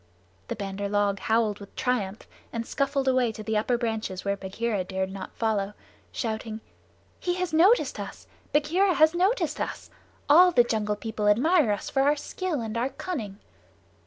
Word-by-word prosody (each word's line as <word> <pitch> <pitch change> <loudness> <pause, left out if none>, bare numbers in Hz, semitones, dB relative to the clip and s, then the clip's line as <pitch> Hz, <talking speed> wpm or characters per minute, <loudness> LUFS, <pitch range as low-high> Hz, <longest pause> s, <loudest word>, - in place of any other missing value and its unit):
The - - -3
Bandar 200 0 -4
log 205 -1 +1
howled 220 -1 +1
with 200 -1 -12
triumph 220 -6 -1 0.3
and 230 -1 -3
scuffled 275 0 -1
away 255 -3 +3
to 215 - -8
the 220 0 -2
upper 230 +3 +1
branches 220 -5 -3
where 200 0 +1
Bagheera 200 +1 -2
dared 190 0 -3
not 190 -1 -7
follow, 210 -3 -1 0.4
shouting: 220 -1 -3 0.6
"He 355 0 -1
has 365 -2 -2
noticed 375 +10 +4
us! - - -7 0.3
Bagheera 345 +6 +2
has 315 +1 +5
noticed 355 -3 +1
us. - - -5 0.4
All 355 +5 +7
the 245 -8 +5
Jungle 215 -3 -1
People 210 0 -3
admire 260 - +4
us 205 - -3
for 270 - +2
our 290 +2 +4
skill 320 -1 -3
and 220 0 -4
our 245 +3 0
cunning." 235 - -5
230 Hz, 165 wpm, -26 LUFS, 205-295 Hz, 0.6 s, All